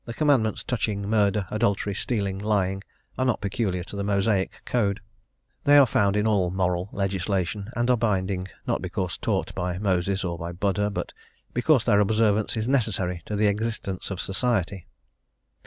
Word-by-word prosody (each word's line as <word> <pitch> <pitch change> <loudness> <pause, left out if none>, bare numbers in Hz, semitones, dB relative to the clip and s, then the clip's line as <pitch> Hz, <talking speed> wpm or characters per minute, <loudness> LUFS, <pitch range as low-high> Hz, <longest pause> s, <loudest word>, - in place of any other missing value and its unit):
The 115 - -7
Commandments 135 -8 +2
touching 100 -4 -2
murder, 105 -2 +2
adultery, 105 -2 0
stealing, 100 -2 -2
lying 100 -2 0 0.4
are 130 - +2
not 125 -3 +1
peculiar 100 -3 -1
to 100 - -10
the 100 - -2
Mosaic 100 -1 +1 0.2
code. 100 -5 0 0.6
They 145 0 +6
are 140 - +8
found 100 -4 +2
in 105 - +1
all 100 -5 +2
moral 90 0 -1
legislation, 95 0 -2
and 120 0 +1
are - - +5
binding 95 -5 0 0.2
not - - -1
because 90 -2 -3
taught - - -1
by 90 0 -2
Moses 95 -1 0
or 85 -2 -3
by 85 +1 -5
Buddha, 100 +3 0
but 100 - -4 0.4
because 130 +1 +3
their 105 -4 +4
observance 110 +1 +2
is 110 +1 -1
necessary 100 -9 0
to 105 - -2
the 105 +1 +2
existence 105 -2 -2
of 95 -3 -4
society. 95 -3 -1
100 Hz, 165 wpm, -25 LUFS, 95-110 Hz, 0.6 s, are